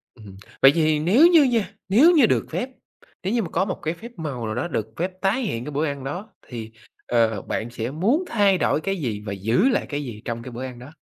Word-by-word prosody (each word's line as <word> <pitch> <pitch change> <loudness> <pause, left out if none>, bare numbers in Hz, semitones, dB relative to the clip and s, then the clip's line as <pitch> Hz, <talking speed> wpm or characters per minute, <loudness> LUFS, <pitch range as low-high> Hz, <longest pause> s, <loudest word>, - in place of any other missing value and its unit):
Ừm, 105 -5 -13 0.2
vậy 135 - +9
thì 155 -2 +2
nếu 210 - +6
như 335 -4 +6
nha, 235 -6 +1 0.2
nếu 270 - +6
như 305 -8 +6
được - - +1
phép, 255 - -2 0.5
nếu 190 +4 -1
như 235 -2 +1
mà 175 - -6
có 185 +3 +1
một 185 - -4
cái 160 - -1
phép 225 +8 -11
màu 140 -8 -4
nào 110 0 -3
đó 120 +7 -2
được 110 -10 -2
phép 180 +3 -1
tái 200 +7 +1
hiện 120 - -3
cái 150 - -5
bữa 150 +3 0
ăn 140 -3 -4
đó, 180 +11 -5 0.2
thì, 115 -3 -7 0.4
ờ, 115 -4 +2
bạn 115 +1 -4
sẽ 120 +1 -4
muốn 215 - +1
thay 200 -4 +3
đổi 155 - +1
cái 195 +3 -2
gì 115 - -3
và 100 - -3
giữ 115 - +2
lại 250 - 0
cái 145 0 -3
gì 115 -5 -8
trong 115 -1 -4
cái 125 - -8
bữa 120 +2 -6
ăn 125 -2 -8
đó? 125 +4 -11
150 Hz, 255 wpm, -23 LUFS, -, 0.5 s, vậy